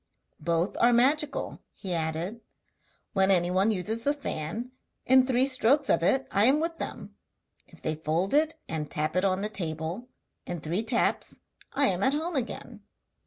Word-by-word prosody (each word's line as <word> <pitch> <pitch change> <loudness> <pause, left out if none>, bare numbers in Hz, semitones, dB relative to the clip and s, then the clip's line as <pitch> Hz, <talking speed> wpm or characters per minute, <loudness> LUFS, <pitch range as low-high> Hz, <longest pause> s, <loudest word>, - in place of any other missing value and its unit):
'Both 170 +4 0
are 240 - +5
magical,' 280 +5 +1 0.2
he 190 -3 -4
added; 165 +7 -2 0.7
'when 195 -1 +3
anyone 185 +2 +3
uses 220 +3 -2
the 285 +3 +1
fan, 230 - -4 0.3
in 260 0 +5
three 255 0 +3
strokes 270 +2 +3
of 165 - +3
it 265 +10 +2
I 200 +2 +4
am 275 +4 +5
with 330 +1 -2
them; - - -6 0.5
if - - -18
they 155 - 0
fold 160 - -1
it 310 +2 +3
and 155 -2 -4
tap 155 +2 -2
it 185 - +2
on 195 0 +1
the - - +1
table, 170 +3 -4 0.4
in 175 - -4
three 165 +7 -1
taps 230 +1 0 0.4
I 280 - +3
am 190 -7 +1
at 265 +7 +3
home 325 +3 -2
again. 250 -4 -4
205 Hz, 165 wpm, -28 LUFS, 170-260 Hz, 0.7 s, are